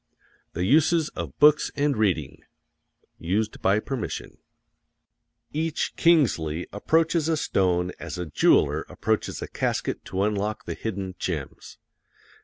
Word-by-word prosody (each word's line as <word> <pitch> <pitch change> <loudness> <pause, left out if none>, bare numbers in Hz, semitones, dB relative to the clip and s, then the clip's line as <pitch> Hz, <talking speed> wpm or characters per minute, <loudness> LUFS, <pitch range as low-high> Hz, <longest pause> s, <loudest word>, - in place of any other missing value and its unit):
THE 90 +2 -1
USES 155 - +3
OF - - -7
BOOKS 150 0 +5
AND 145 0 +1
READING 90 -10 0 0.8
Each 105 +6 -1 2.4
Kingsley 90 - +2
approaches 160 +8 +1
a 160 - +2
stone 90 -8 +1
as 85 +1 -6
a 90 - -3
jeweler 75 - +3
approaches - - -2
a - - -5
casket - - -2
to 95 +1 -1
unlock 105 +1 -1
the - - -3
hidden 100 -4 -4
gems. 80 -7 -5
105 Hz, 105 wpm, -25 LUFS, 90-150 Hz, 2.4 s, BOOKS